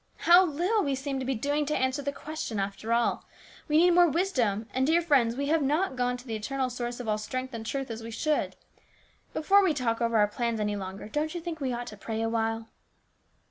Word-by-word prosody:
How 350 Hz, +2 st, +8 dB
little 360 Hz, +7 st, +1 dB
we 280 Hz, -2 st, 0 dB
seem 270 Hz, 0 st, -3 dB
to 260 Hz, -, -4 dB
be 265 Hz, -, 0 dB
doing 290 Hz, +6 st, 0 dB
to 300 Hz, -, 0 dB
answer 260 Hz, +2 st, 0 dB
the 280 Hz, 0 st, -2 dB
question, 285 Hz, -7 st, -5 dB
after 200 Hz, +3 st, -3 dB
all. 235 Hz, 0 st, +1 dB, 0.4 s
We 305 Hz, -1 st, +3 dB
need 350 Hz, +2 st, +6 dB
more 350 Hz, 0 st, +6 dB
wisdom, 255 Hz, -, 0 dB
and, 260 Hz, +1 st, +1 dB
dear 325 Hz, +2 st, +4 dB
friends, 275 Hz, -9 st, +2 dB
we 280 Hz, +2 st, -2 dB
have 320 Hz, 0 st, +3 dB
not 295 Hz, +3 st, +1 dB
gone 250 Hz, 0 st, 0 dB
to 250 Hz, -, -13 dB
the 230 Hz, -, -5 dB
eternal 255 Hz, +4 st, -2 dB
source 240 Hz, 0 st, -4 dB
of 245 Hz, -, -6 dB
all 215 Hz, 0 st, 0 dB
strength 255 Hz, +4 st, -4 dB
and 225 Hz, -1 st, -5 dB
truth 270 Hz, +2 st, -3 dB
as 225 Hz, 0 st, -6 dB
we 225 Hz, -, -7 dB
should. 300 Hz, +7 st, -1 dB, 0.8 s
Before 395 Hz, +6 st, +4 dB
we 340 Hz, -5 st, +2 dB
talk 235 Hz, -4 st, -1 dB
over 230 Hz, -1 st, +2 dB
our 210 Hz, -1 st, +5 dB
plans 230 Hz, +1 st, -2 dB
any 210 Hz, -1 st, -1 dB
longer, 190 Hz, 0 st, -6 dB
don't 305 Hz, +7 st, -2 dB
you -, -, -2 dB
think 335 Hz, -1 st, -5 dB
we 260 Hz, -2 st, -1 dB
ought 240 Hz, 0 st, -3 dB
to 215 Hz, -3 st, -9 dB
pray 220 Hz, +2 st, -3 dB
awhile 225 Hz, 0 st, -1 dB
260 Hz, 230 wpm, -28 LUFS, 225-305 Hz, 0.8 s, How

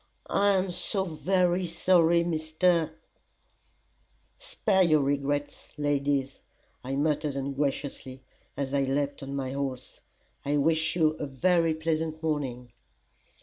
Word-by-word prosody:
"I 200 Hz, 0 st, +4 dB
am 190 Hz, -1 st, 0 dB
so 190 Hz, +2 st, -1 dB
very 180 Hz, +1 st, +1 dB
sorry, 170 Hz, 0 st, +3 dB
Mr. 165 Hz, 0 st, +1 dB, 0.8 s
." -, -, -40 dB
"Spare 210 Hz, -, +1 dB
your 155 Hz, -4 st, +4 dB
regrets, 145 Hz, +1 st, -2 dB
ladies," 140 Hz, -2 st, 0 dB, 0.4 s
I 135 Hz, +2 st, -3 dB
muttered 150 Hz, 0 st, 0 dB
ungraciously, 135 Hz, -1 st, -3 dB, 0.3 s
as 140 Hz, -1 st, -3 dB
I 140 Hz, -, +2 dB
leapt 140 Hz, +1 st, -1 dB
on 135 Hz, 0 st, -5 dB
my 130 Hz, -2 st, -3 dB
horse. 135 Hz, -2 st, -5 dB, 0.4 s
"I 145 Hz, +1 st, 0 dB
wish 160 Hz, +2 st, +1 dB
you 160 Hz, -3 st, +4 dB
a 145 Hz, -, -3 dB
very 165 Hz, +4 st, +2 dB
pleasant 160 Hz, 0 st, -2 dB
morning." 130 Hz, -6 st, -2 dB
150 Hz, 120 wpm, -28 LUFS, 140-170 Hz, 0.8 s, I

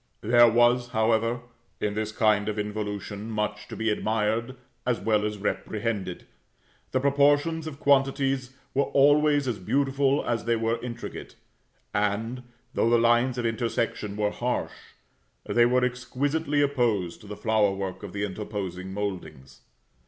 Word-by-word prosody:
There 120 Hz, +2 st, +6 dB
was, 120 Hz, +2 st, +3 dB
however, 115 Hz, +1 st, +1 dB, 0.4 s
in 105 Hz, -, -1 dB
this 110 Hz, 0 st, -2 dB
kind 105 Hz, -1 st, +2 dB
of 105 Hz, -, -3 dB
involution, 105 Hz, 0 st, -4 dB
much 105 Hz, -1 st, -3 dB
to -, -, -7 dB
be 110 Hz, -1 st, 0 dB
admired 110 Hz, +3 st, -1 dB, 0.3 s
as 125 Hz, -2 st, 0 dB
well 105 Hz, -2 st, +1 dB
as 105 Hz, 0 st, -3 dB
reprehended, 105 Hz, -2 st, -3 dB, 0.7 s
the 130 Hz, -, +1 dB
proportions 145 Hz, +4 st, +2 dB
of 140 Hz, -3 st, -7 dB
quantities 135 Hz, -2 st, +2 dB, 0.2 s
were 140 Hz, +1 st, +2 dB
always 145 Hz, 0 st, +4 dB
as 115 Hz, -5 st, -2 dB
beautiful 135 Hz, +5 st, +1 dB
as 115 Hz, -3 st, -1 dB
they 115 Hz, 0 st, +2 dB
were 115 Hz, +1 st, -1 dB
intricate; 120 Hz, -1 st, -7 dB, 0.6 s
and, 105 Hz, +4 st, -1 dB, 0.3 s
though 115 Hz, -, +2 dB
the 120 Hz, -, +5 dB
lines 120 Hz, +2 st, +3 dB
of 120 Hz, -, -2 dB
intersection 115 Hz, -2 st, -2 dB
were 105 Hz, -1 st, +1 dB
harsh, -, -, -2 dB, 0.7 s
they 120 Hz, 0 st, +4 dB
were 125 Hz, +1 st, +3 dB
exquisitely 145 Hz, +4 st, 0 dB
opposed 110 Hz, -11 st, 0 dB
to 105 Hz, -, -13 dB
the 105 Hz, 0 st, -7 dB
flower 110 Hz, -2 st, +2 dB
work 95 Hz, -1 st, -4 dB
of -, -, -7 dB
the 105 Hz, 0 st, -3 dB
interposing 95 Hz, -2 st, -5 dB
mouldings. 85 Hz, -10 st, -6 dB
115 Hz, 145 wpm, -26 LUFS, 105-130 Hz, 0.7 s, There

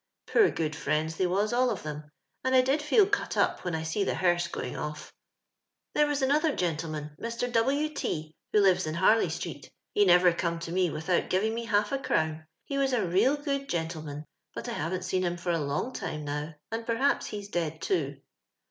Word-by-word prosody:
i*oor 425 Hz, -4 st, +6 dB
good 155 Hz, -2 st, -2 dB
fjriends 155 Hz, +2 st, -1 dB
they 185 Hz, -, +2 dB
was 200 Hz, +5 st, +1 dB
all 250 Hz, +1 st, +3 dB
of -, -, -3 dB
them, 150 Hz, 0 st, -6 dB, 0.3 s
and 260 Hz, 0 st, +2 dB
I 255 Hz, -, +8 dB
did 270 Hz, +4 st, +1 dB
feel 350 Hz, +8 st, +5 dB
cut 410 Hz, +1 st, -1 dB
up -, -, +1 dB
when 175 Hz, -2 st, -2 dB
I 160 Hz, -, -2 dB
sec 160 Hz, +5 st, -1 dB
the -, -, +1 dB
hesrse 175 Hz, -1 st, +1 dB
going 125 Hz, -, -4 dB
olT. 150 Hz, 0 st, -5 dB, 0.4 s
" -, -, -58 dB
There 300 Hz, -, +4 dB
was 290 Hz, -2 st, 0 dB
another 300 Hz, +3 st, +2 dB
gentleman, 155 Hz, -3 st, -3 dB
Mr. 235 Hz, +1 st, -2 dB
W. 270 Hz, +6 st, +2 dB
T, 155 Hz, -, -3 dB, 0.2 s
who 210 Hz, -, +5 dB
lives 190 Hz, -5 st, +3 dB
in 155 Hz, -, -2 dB
Harley>street; 200 Hz, +6 st, +1 dB, 0.2 s
he 205 Hz, -, +4 dB
nerer 180 Hz, -2 st, +6 dB
come 170 Hz, -1 st, -1 dB
by 165 Hz, 0 st, -6 dB
me 180 Hz, 0 st, +2 dB
without 160 Hz, +4 st, 0 dB
giving 210 Hz, +4 st, +1 dB
mo 235 Hz, +1 st, -3 dB
half 205 Hz, -1 st, +2 dB
a 275 Hz, -, 0 dB
orown. 160 Hz, -8 st, -1 dB, 0.2 s
He 275 Hz, -, -2 dB
was 270 Hz, -1 st, +1 dB
a 225 Hz, -6 st, +2 dB
real 195 Hz, +12 st, +3 dB
good 280 Hz, -1 st, -3 dB
gentleman; 155 Hz, -3 st, -3 dB, 0.3 s
but -, -, -5 dB
I -, -, -3 dB
haven't 175 Hz, +4 st, -2 dB
seen 185 Hz, +1 st, 0 dB
liim 175 Hz, -1 st, -1 dB
for 175 Hz, 0 st, -1 dB
a 165 Hz, -, +1 dB
long 145 Hz, -, -2 dB
time 150 Hz, -1 st, -4 dB
now, 150 Hz, +2 st, -4 dB, 0.2 s
and 225 Hz, +1 st, -2 dB
porhapi 235 Hz, +5 st, +1 dB
he's 205 Hz, -1 st, -6 dB
dead 160 Hz, -4 st, -2 dB
too. 380 Hz, -, -1 dB
185 Hz, 210 wpm, -29 LUFS, 160-245 Hz, 0.4 s, I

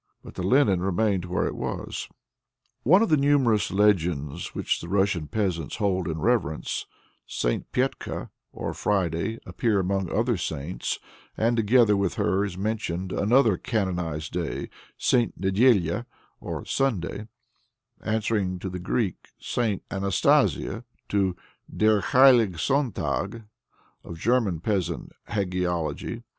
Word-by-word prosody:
But -, -, -11 dB
the -, -, -5 dB
linen 100 Hz, -2 st, +3 dB
remained 95 Hz, 0 st, +1 dB
where 90 Hz, 0 st, -1 dB
it -, -, -2 dB
was. -, -, -4 dB, 0.8 s
In -, -, -3 dB
one 190 Hz, +5 st, +7 dB
of 225 Hz, -, 0 dB
the 155 Hz, -, +5 dB
numerous 135 Hz, -7 st, +3 dB
legends 85 Hz, -7 st, +1 dB
which -, -, -1 dB
the 85 Hz, -, -7 dB
Russian 95 Hz, -4 st, +1 dB
peasants 90 Hz, -7 st, -2 dB
hold 95 Hz, -5 st, 0 dB
in 80 Hz, -1 st, -2 dB
reverence, 95 Hz, -11 st, 0 dB, 0.4 s
St. -, -, -2 dB
Petka -, -, -2 dB, 0.2 s
or -, -, -4 dB
Friday 95 Hz, +1 st, -1 dB
appears 100 Hz, +2 st, 0 dB
among 95 Hz, 0 st, -1 dB
the -, -, -4 dB
other 115 Hz, +1 st, +1 dB
saints, 80 Hz, 0 st, -3 dB, 0.4 s
and 115 Hz, +2 st, +2 dB
together 115 Hz, -1 st, +4 dB
with 100 Hz, -2 st, 0 dB
her 95 Hz, +2 st, +1 dB
is 95 Hz, -3 st, -4 dB
mentioned 95 Hz, -3 st, -2 dB
another 110 Hz, -1 st, +3 dB
canonized 90 Hz, -, -2 dB
day, 85 Hz, -3 st, -3 dB, 0.3 s
St. 120 Hz, -7 st, +1 dB
Nedélya 100 Hz, +1 st, +2 dB, 0.3 s
or -, -, -5 dB
Sunday, 110 Hz, -5 st, -1 dB, 0.8 s
answering 110 Hz, -4 st, 0 dB
to 95 Hz, +1 st, -5 dB
the 90 Hz, -, -5 dB
Greek 95 Hz, +2 st, -2 dB
St. 110 Hz, -6 st, -1 dB
Anastasia, 100 Hz, +4 st, +2 dB, 0.3 s
to 95 Hz, -3 st, +1 dB, 0.4 s
Der 110 Hz, -1 st, +3 dB
heilige 120 Hz, -9 st, +5 dB
Sonntag 115 Hz, -, -1 dB, 0.6 s
of 85 Hz, -, -8 dB
German 105 Hz, -4 st, +1 dB
peasant 100 Hz, -3 st, -2 dB, 0.2 s
hagiology. 90 Hz, +1 st, -2 dB
100 Hz, 125 wpm, -26 LUFS, 90-115 Hz, 0.8 s, one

